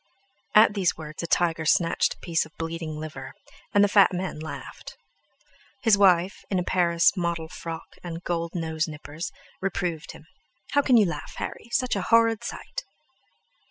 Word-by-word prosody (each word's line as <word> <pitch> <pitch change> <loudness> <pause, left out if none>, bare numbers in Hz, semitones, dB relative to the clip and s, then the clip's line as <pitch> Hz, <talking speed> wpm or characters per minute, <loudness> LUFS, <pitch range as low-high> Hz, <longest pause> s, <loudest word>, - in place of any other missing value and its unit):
At 215 0 +7
these 190 -4 +1
words 155 -1 -7
a 170 - -3
tiger 165 -1 +1
snatched 165 +1 +2
a - - -29
piece 170 -2 +1
of 160 - -15
bleeding 165 -1 -4
liver, 145 -4 -7 0.4
and 205 - +5
the - - +5
fat 200 -1 +5
man 180 -3 -3
laughed. 155 0 -8 0.9
His 225 -3 +6
wife, 185 -2 +3
in 190 - 0
a 180 - +1
Paris 170 -1 +3
model 170 -3 -2
frock 165 +1 -8
and 170 -1 -6
gold 170 -1 -2
nose 160 -1 -1
nippers, 155 +4 -6 0.3
reproved 175 -4 -2
him: - - -14 0.5
"How 285 - +4
can 255 -3 +4
you 215 - +6
laugh, 175 - -5
Harry? 235 - -6
Such 255 0 +1
a - - -1
horrid 230 -1 +3
sight!" - - -6
170 Hz, 165 wpm, -26 LUFS, 165-195 Hz, 0.9 s, At